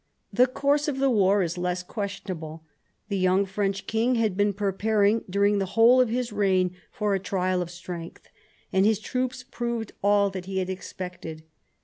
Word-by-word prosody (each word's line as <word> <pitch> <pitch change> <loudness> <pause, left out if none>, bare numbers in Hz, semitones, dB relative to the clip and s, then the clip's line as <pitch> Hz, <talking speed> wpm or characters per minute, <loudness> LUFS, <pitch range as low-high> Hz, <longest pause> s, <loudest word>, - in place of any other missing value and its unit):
The 250 +1 +5
course 285 +3 +1
of 285 -3 -1
the 270 0 +2
war 200 -3 +4
is 170 +1 -3
less 180 0 -1
questionable. 180 -6 -6 0.5
The 200 -2 -1
young 185 +2 +3
French 195 0 -2
king 230 +3 +1
had 220 -5 +1
been 205 +1 +2
pre 200 0 -1
paring 210 +2 +2
during 200 +2 +2
the 195 - -1
whole 240 +3 +7
of 250 - +2
his 240 -1 -2
reign 185 -3 +2 0.2
for 210 -1 -1
a 195 - +1
trial 185 -1 0
of 175 - -4
strength, 175 -1 -8 0.5
and 190 - +4
his 215 +1 +4
troops 255 +4 -3
proved 235 -3 -4
all 200 0 +4
that 185 -2 -6
he 190 0 -4
had 190 0 -1
expected. 180 -4 -7
200 Hz, 185 wpm, -26 LUFS, 185-225 Hz, 0.5 s, whole